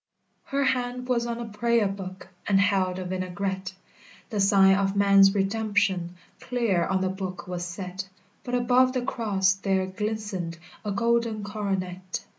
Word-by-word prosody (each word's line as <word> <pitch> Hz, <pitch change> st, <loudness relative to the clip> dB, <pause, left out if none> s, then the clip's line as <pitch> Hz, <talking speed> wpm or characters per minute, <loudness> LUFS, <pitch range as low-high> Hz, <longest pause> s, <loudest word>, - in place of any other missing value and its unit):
Her 280 Hz, 0 st, 0 dB
hand 250 Hz, -1 st, -1 dB
was 240 Hz, -2 st, +1 dB
on 235 Hz, 0 st, -3 dB
a 235 Hz, -, -4 dB
prayer 225 Hz, 0 st, +1 dB
book, 190 Hz, -1 st, -7 dB, 0.2 s
And 195 Hz, -1 st, +4 dB
held 190 Hz, -2 st, +2 dB
a 185 Hz, -, -4 dB
vinaigrette; 185 Hz, +1 st, -3 dB, 0.6 s
The 210 Hz, -, -1 dB
sign 195 Hz, -1 st, +6 dB
of 195 Hz, 0 st, 0 dB
man's 200 Hz, 0 st, +6 dB
redemption 195 Hz, -3 st, 0 dB, 0.2 s
Clear 225 Hz, -9 st, 0 dB
on 190 Hz, -1 st, 0 dB
the 190 Hz, -, +1 dB
book 190 Hz, -1 st, -5 dB
was 180 Hz, -1 st, -4 dB
set, 185 Hz, +1 st, -6 dB, 0.3 s
But 245 Hz, -, -2 dB
above 250 Hz, +1 st, +3 dB
the 255 Hz, -2 st, -1 dB
cross 205 Hz, -6 st, +1 dB
there 195 Hz, -1 st, 0 dB
glistened 195 Hz, -3 st, -4 dB, 0.3 s
A 210 Hz, -, -3 dB
golden 230 Hz, 0 st, +1 dB
Coronet. 190 Hz, -3 st, -3 dB
195 Hz, 150 wpm, -26 LUFS, 190-225 Hz, 0.6 s, sign